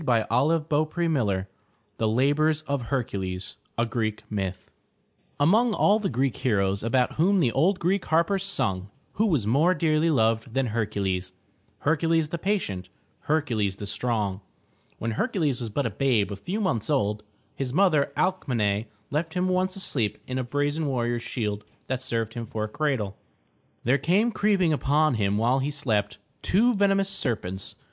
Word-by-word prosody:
422 130 +6 +2
THE 155 0 +2
TREASURE 145 - 0
CHEST - - -15 0.5
THE 110 - +2
LABORS 145 +7 +2
OF 140 -3 -2
HERCULES 95 -8 -3 0.2
A 115 - +2
Greek 110 -2 -2
Myth 95 -3 -4 0.7
Among 215 +10 +4
all 210 +2 +4
the 205 - -1
Greek 130 0 0
heroes 100 -5 +1
about 125 +3 +1
whom 190 +5 +4
the 130 -9 +3
old 170 - +2
Greek 185 +2 0
harpers 170 +4 +2
sung, 95 - -1 0.2
who 220 +2 +2
was 150 - +1
more 150 - +3
dearly 155 0 +2
loved 115 -3 +1
than 135 -1 +2
Her'cu 110 -2 -2
les— 95 -1 -2 0.5
Hercules, 160 0 +2
the 170 - -4
patient, 160 - -2 0.3
Hercules 120 -11 0
the 105 - -7
strong? 105 -2 -1 0.6
When 115 - -2
Hercules 155 - 0
was 115 - -3
but 135 +6 -1
a 115 - -1
babe 110 -3 +1
a - - -3
few 180 - -4
months 120 - -1
old, 105 -8 +1 0.3
his 135 -2 -3
mother, 155 -3 +3
Alc 185 -1 0
me'ne, 105 -4 +1 0.3
left 160 +3 -2
him 180 +1 +1
once 185 0 +1
asleep 130 - -1
in 130 0 -3
a - - -1
brazen 145 +4 -1
warrior's 120 -3 -1
shield 105 -4 -3 0.2
that 130 -1 -2
served 115 -3 -2
him 115 -1 -5
for 110 0 -3
a - - -1
cradle. 125 -6 -1 0.7
There 130 +4 +3
came 195 - +2
creeping 200 -6 +2
upon 150 +1 +2
him 100 -3 +1
while 120 +5 +2
he 135 +2 -1
slept, 110 -8 -1 0.2
two 235 +6 +3
venemous 195 -1 +2
serpents. 100 - -3
135 Hz, 165 wpm, -26 LUFS, 110-165 Hz, 0.7 s, Among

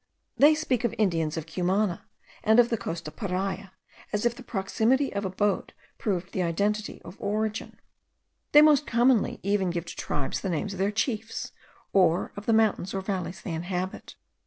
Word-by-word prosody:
They 300 +2 +6
speak 270 -7 0
of 235 - 0
Indians 165 -7 +1
of 160 - -3
Cumana 180 +2 0 0.4
and 220 +2 +5
of 240 -1 +6
the 230 - 0
coast 165 -1 -5
of 155 - -9
Paria, 195 -1 -3 0.4
as 210 +2 -1
if 240 - +3
the 250 - -12
proximity 235 +5 +1
of 200 0 -2
abode 195 +1 -1 0.3
proved 185 -4 -2
the 190 - 0
identity 205 +5 -1
of 185 - -11
origin. 215 +1 -2 0.7
They 295 +1 +9
most 300 -2 +5
commonly 240 -1 +3
even 200 -1 +1
give 170 0 -3
to 170 - -8
tribes 145 -2 -3
the 195 - -2
names 180 +4 -2
of 190 - -8
their 195 +1 +2
chiefs, 220 +1 -2 0.4
or 180 -3 +3
of 205 0 -8
the - - +4
mountains 215 -4 +2
or 195 - -1
valleys 190 -2 -4
they 175 - -4
inhabit. 180 +3 -4
200 Hz, 180 wpm, -27 LUFS, 180-220 Hz, 0.7 s, They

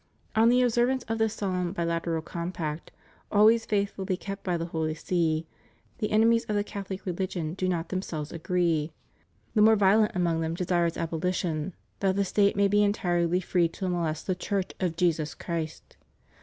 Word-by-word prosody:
On 225 +1 +5
the 250 +1 +4
observance 245 +2 +2
of 225 -1 -3
this 220 -1 +1
solemn, 180 -3 -2
bi 170 - -2
lateral 165 -1 -1
compact, 170 -2 -4 0.4
always 220 +2 +5
faithfully 200 -2 -1
kept 195 +1 -7
by 180 -2 0
the 165 - -3
Holy 160 -2 -2
See, 165 -1 0 0.5
the 215 - -1
enemies 230 +2 +4
of 215 - -2
the 205 - +2
Catholic 195 -2 -6
religion 175 -3 -2
do 185 0 -1
not 170 -2 -2
themselves 160 -5 -4
agree.... 165 -2 0 0.6
The 215 - +3
more 220 +1 +7
violent 210 +2 +4
among 170 -2 +1
them 165 0 -2
desire 175 -1 +1
its 165 - -4
abolition, 165 0 -2 0.2
that 190 -1 +1
the 200 0 +1
State 200 +1 +2
may 200 0 +4
be 205 +1 +3
entirely 180 -4 +1
free 175 -1 +2
to 185 +3 -5
molest 165 -3 -2
the 185 - +1
Church 190 +1 -2
of 180 -3 -1
JESUS 165 -3 0
CHRIST. 165 -2 -5
180 Hz, 175 wpm, -27 LUFS, 165-200 Hz, 0.6 s, more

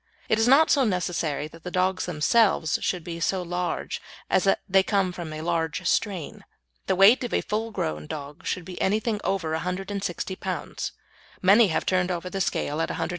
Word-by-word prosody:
It 220 - +3
is 225 - +3
not 280 +5 +6
so 280 - +4
necessary 170 - -1
that 165 +1 -14
the 180 - -4
dogs 185 +1 0
themselves 175 0 +2
should 180 -3 -1
be 170 0 -6
so 180 +3 0
large 175 0 -3 0.3
as 185 - +3
that 195 - +3
they 195 -1 +5
come 195 -1 +1
from 175 -3 -7
a 155 0 -5
large 165 -1 -1
strain. 190 -8 -1 0.4
The - - +2
weight 200 +8 +6
of 245 - -2
a - - +2
full 220 +2 -2
grown 75 - -3
dog 145 - -7
should 180 - -2
be 180 0 -7
anything 215 +2 0
over 180 -5 -1
160 190 +2 -3
lb. - - -4 0.5
Many 205 +4 +7
have 160 - -1
turned 185 -1 +1
over 180 0 -3
the 195 - -2
scale 150 -3 -1
at - - -1
180 - - -4
lb. - - -1
180 Hz, 195 wpm, -25 LUFS, 165-200 Hz, 0.5 s, Many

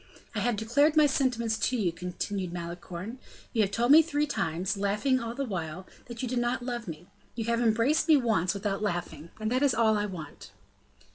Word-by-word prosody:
"I - - -2
have 240 -2 +1
declared 275 +9 +2
my 305 - +7
sentiments 245 -5 0
to 250 +4 +1
you," 190 -6 +1
continued 180 +2 -4
Malicorne. 175 +6 -6 0.3
"You 225 - +2
have 200 - +2
told 235 +5 +1
me 315 +2 +10
three 300 -2 0
times, 190 - -2
laughing 210 +7 +1
all 230 -1 -5
the 275 - -2
while, 180 -4 -5 0.2
that 235 0 -7
you - - -1
did 245 0 -1
not 240 0 -1
love 240 -3 -4
me; 165 +1 -7 0.3
you 230 -2 -3
have 235 +1 +1
embraced 230 +8 +2
me 315 -2 +7
once 215 -8 +1
without 200 0 -2
laughing, 170 -5 -3
and 215 +1 -2
that 255 +1 +1
is 280 -4 +3
all 220 -1 +3
I 205 - -1
want." 155 - -9
220 Hz, 205 wpm, -28 LUFS, 185-245 Hz, 0.3 s, me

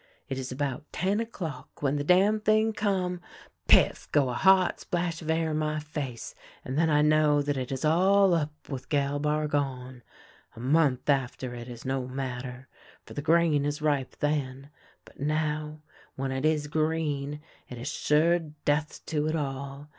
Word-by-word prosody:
" - - -40
It 135 - -2
is 130 0 -5
about 140 +1 -3
ten 195 +3 0
o'clock 170 - -6
when 140 0 +2
the 145 - -1
damn 195 +7 +4
thing 215 +1 +2
come. 185 -4 -1 0.5
PifT! - - +4
go 140 -4 +3
a - - -2
hot 190 +5 +4
splash 175 -1 -2
of 160 - -7
air 160 0 +1
in 155 - 0
my 155 0 -1
face, 145 -5 -6 0.3
and 130 - -4
then 160 +2 +3
I 150 -1 +4
know 150 -1 +4
that 145 0 -1
it 130 -1 -4
is 135 +2 -2
all 190 +4 +4
up 155 -3 0 0.2
wath 135 -3 -6
Gal 145 -1 +1
Bargon. 145 -4 -1 0.5
A - - -11
month 135 0 +2
after 130 -3 0
it 120 0 -8
is 120 +1 -9
no 130 -1 -1
matter, 130 -1 -5 0.4
for - - -11
the 145 - -4
grain 160 -2 +3
is 145 +1 -2
ripe 145 -4 0
then, 140 -2 -2 0.3
but - - -19
now, 150 +1 -2 0.3
when 135 0 -3
it 130 +2 -2
is 155 -1 +2
green, 150 -2 -1 0.3
it 125 - -7
is 120 +3 -6
sure 160 +4 +2
death 150 -1 -2
to 150 -1 -1
it 155 - 0
all. 140 -1 -4
150 Hz, 175 wpm, -28 LUFS, 135-160 Hz, 0.5 s, damn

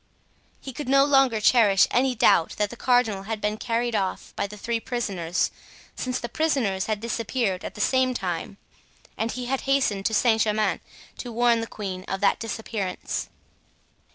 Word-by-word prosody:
He 265 - -8
could 290 +1 -6
no 275 0 +5
longer 270 -5 +4
cherish 210 -3 +5
any 255 +1 +2
doubt 170 -6 +3
that 210 -1 0
the - - -7
cardinal 240 -5 +2
had 220 -1 -2
been 210 +1 -1
carried 235 +1 -1
off 190 -2 -2
by - - -1
the 210 +1 -10
three 230 +3 -2
prisoners, 195 -9 -2 0.4
since 255 0 -2
the 240 - -4
prisoners 235 -9 0
had 215 -2 -1
disappeared 230 -3 -2
at - - -7
the 210 - -4
same 260 +2 +2
time; 180 -1 -4 0.6
and 225 +1 -2
he 250 -1 -5
had 265 +2 -1
hastened 220 -8 +2
to 220 - -3
Saint 225 -1 +3
Germain 215 0 +1 0.4
to 245 - -6
warn 235 0 +3
the 225 - -4
queen 190 -4 -6
of 195 - -3
that 200 - +2
disappearance. 220 -4 -4
225 Hz, 175 wpm, -25 LUFS, 200-245 Hz, 0.6 s, no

